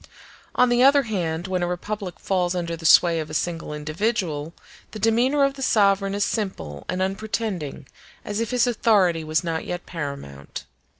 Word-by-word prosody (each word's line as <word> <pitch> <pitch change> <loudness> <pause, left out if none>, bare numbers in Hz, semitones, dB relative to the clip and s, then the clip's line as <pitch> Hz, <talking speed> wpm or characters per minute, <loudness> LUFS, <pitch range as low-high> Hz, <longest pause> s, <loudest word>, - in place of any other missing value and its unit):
On 250 - +4
the 240 0 +3
other 280 +2 +6
hand, 175 -7 -2
when 185 -1 -1
a 175 - 0
republic 185 +1 -4
falls 180 -2 0
under 170 -1 -2
the 165 -1 -1
sway 170 0 +6
of 155 -1 -5
a 155 - -6
single 165 -1 -2
individual, 155 0 -2 0.4
the - - -5
demeanor 240 +7 +2
of 275 0 +2
the 270 - -10
sovereign 200 -4 +3
is 205 - +1
simple 135 - -4
and 185 +1 0
unpretending, 195 - -3 0.4
as 205 +1 -3
if 230 - -1
his 250 -1 +2
authority 200 -8 +2
was 155 +1 0
not 165 -1 -2
yet 175 0 -5
paramount. 140 - -7
185 Hz, 175 wpm, -23 LUFS, 165-220 Hz, 0.4 s, other